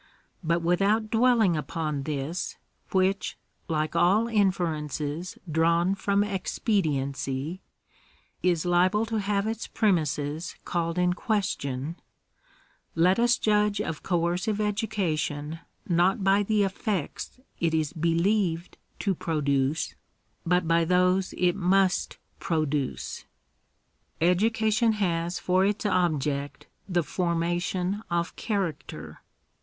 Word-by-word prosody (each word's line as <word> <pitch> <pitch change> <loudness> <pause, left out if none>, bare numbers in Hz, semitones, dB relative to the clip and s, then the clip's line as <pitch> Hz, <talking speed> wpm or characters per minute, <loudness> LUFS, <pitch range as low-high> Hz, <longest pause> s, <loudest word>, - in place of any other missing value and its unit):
But 170 +1 +1
without 200 +5 +2
dwelling 230 -6 +4
upon 150 -1 -2
this, 150 +5 -3 0.3
which, 190 +1 +1 0.3
like 155 -1 -1
all 190 +7 +4
inferences 170 - -1
drawn 170 +3 +2
from 200 +1 +1
expediency, 155 - -1 0.8
is 175 -3 +1
liable 180 +5 +3
to 225 -1 -2
have 200 0 0
its 225 0 -3
premises 155 - 0
called 170 0 -1
in 180 0 +3
question, 170 - -2 1.0
let 180 +5 +4
us 240 0 +4
judge 210 -1 +2
of 155 - -3
ooercive 180 +4 0
education 180 -8 -1 0.3
not 180 +3 +2
by 195 +1 +4
the 210 0 +2
effects 195 - -3 0.2
it 165 -1 +1
is 155 -2 0
believed 170 +1 0 0.2
to 195 - 0
produce, 145 -3 0 0.5
but 180 -1 +2
by 165 0 +3
those 180 +2 +2
it 180 -1 +2
must 190 -1 +2 0.2
produce, 150 -6 -2 0.9
k 170 +2 +4
Education 220 +3 +2
has 175 -4 -1
for 185 +1 +2
its 205 +2 0
object 150 -7 0 0.2
the 175 -2 +1
formation 175 +3 -1
of 170 0 -1
character. 195 -9 -4
180 Hz, 105 wpm, -27 LUFS, 160-200 Hz, 1.0 s, dwelling